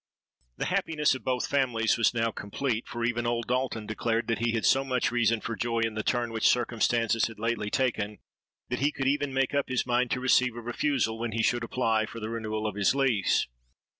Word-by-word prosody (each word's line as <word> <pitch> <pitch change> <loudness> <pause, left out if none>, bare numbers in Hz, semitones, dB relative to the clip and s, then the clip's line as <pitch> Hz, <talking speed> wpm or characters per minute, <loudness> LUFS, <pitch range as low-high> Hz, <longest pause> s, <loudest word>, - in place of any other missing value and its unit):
"The - - -2
happiness 150 -3 +1
of 130 - -6
both 125 -1 0
families 120 -5 +1
was 115 - +3
now 115 -1 0
complete; 115 +3 -3
for 120 -1 -3
even 120 0 -1
old 120 -1 -1
Dalton 125 -3 -1
declared 115 +2 -1
that 115 - 0
he 115 0 0
had 115 - 0
so 135 - +4
much 130 -2 0
reason 115 -2 +2
for 115 - -4
joy 115 0 -1
in 115 -1 0
the 110 - -2
turn 120 +1 0
which 110 -1 +2
circumstances 115 -1 +1
had 115 - -10
lately 115 -1 -1
taken, 110 -5 -1 0.5
that 125 - -2
he 145 +2 +2
could 135 - -4
even 145 0 +1
make 135 0 0
up 140 -2 0
his 130 -1 0
mind 125 0 +1
to 130 - -1
receive 125 -1 +3
a - - -5
refusal 120 -1 -1
when 115 -1 -3
he 115 0 0
should 120 +1 +1
apply 115 -2 0
for 115 - -8
the 110 0 -5
renewal 110 -1 -3
of 105 - -1
his 100 +5 +2
lease. 125 -8 +2
120 Hz, 220 wpm, -28 LUFS, 115-130 Hz, 0.5 s, so